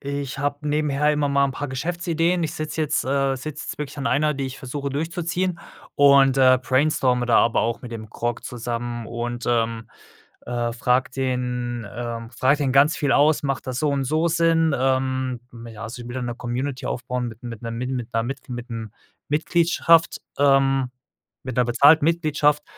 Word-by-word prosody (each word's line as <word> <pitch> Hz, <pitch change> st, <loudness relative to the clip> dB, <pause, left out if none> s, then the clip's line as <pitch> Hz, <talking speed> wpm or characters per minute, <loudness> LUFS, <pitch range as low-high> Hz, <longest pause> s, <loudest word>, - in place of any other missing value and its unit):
ich 140 Hz, -1 st, -4 dB
habe 145 Hz, +1 st, -2 dB
nebenher 150 Hz, 0 st, +1 dB
immer 145 Hz, -1 st, 0 dB
mal 140 Hz, 0 st, +3 dB
'n -, -, -3 dB
paar 145 Hz, +2 st, -4 dB
Geschäftsideen. 170 Hz, +4 st, -1 dB
Ich 160 Hz, -, -2 dB
sitze 155 Hz, +1 st, -3 dB
jetzt 150 Hz, -, 0 dB
äh, 135 Hz, 0 st, +1 dB
sitze 145 Hz, +4 st, -6 dB
jetzt 150 Hz, 0 st, -7 dB
wirklich 150 Hz, 0 st, -5 dB
an 140 Hz, -1 st, -3 dB
einer, 150 Hz, +1 st, +2 dB
die 135 Hz, 0 st, -3 dB
ich 130 Hz, 0 st, -6 dB
versuche 140 Hz, +2 st, -4 dB
durchzuziehen 170 Hz, +4 st, -2 dB, 0.4 s
und, 140 Hz, -1 st, +5 dB
äh, 130 Hz, -1 st, +6 dB
brainstorme 130 Hz, -2 st, +2 dB
da 120 Hz, -, +4 dB
aber 115 Hz, -, +3 dB
auch 115 Hz, 0 st, -1 dB
mit 125 Hz, -, -9 dB
dem 110 Hz, -2 st, -8 dB
Grok 120 Hz, 0 st, -3 dB
zusammen 120 Hz, -1 st, -4 dB
und, 120 Hz, 0 st, -4 dB
ähm, 115 Hz, -1 st, 0 dB, 0.6 s
äh, 120 Hz, -1 st, -2 dB
frage 125 Hz, +2 st, +1 dB
den, 125 Hz, -3 st, -2 dB
ähm, 115 Hz, 0 st, -5 dB
frage 130 Hz, +4 st, +2 dB
den 140 Hz, -3 st, 0 dB
ganz 140 Hz, +4 st, +4 dB
viel 145 Hz, -2 st, 0 dB
aus: 150 Hz, +1 st, +4 dB
„Macht 135 Hz, -1 st, -2 dB
das 125 Hz, -, -3 dB
so 150 Hz, +2 st, +1 dB
und 140 Hz, -2 st, 0 dB
so 155 Hz, +5 st, +1 dB
Sinn?“ 165 Hz, -2 st, +2 dB
Ähm, 130 Hz, -1 st, 0 dB
mm, 115 Hz, 0 st, -10 dB
ja, 110 Hz, -1 st, -9 dB
also 115 Hz, +2 st, -7 dB
ich 120 Hz, -, -9 dB
will 120 Hz, -, -7 dB
da 130 Hz, -, -3 dB
'ne 120 Hz, -, -3 dB
Community 125 Hz, +2 st, -4 dB
aufbauen 125 Hz, 0 st, -3 dB
mit 115 Hz, +1 st, -10 dB
mit 115 Hz, -2 st, -7 dB
'ner 115 Hz, -, -5 dB
mit 120 Hz, +2 st, -4 dB
'ner 115 Hz, -2 st, -2 dB
mit 135 Hz, +2 st, -6 dB, 0.2 s
'nem 115 Hz, -2 st, -6 dB, 0.4 s
Mitgliedschaft 165 Hz, +2 st, +3 dB, 0.2 s
ähm, 135 Hz, -2 st, +3 dB, 0.5 s
mit 130 Hz, 0 st, -5 dB
'ner 125 Hz, -, +3 dB
bezahlten 145 Hz, +6 st, +5 dB
Mitgliedschaft 150 Hz, -3 st, +2 dB
135 Hz, 185 wpm, -23 LUFS, 120-150 Hz, 0.6 s, äh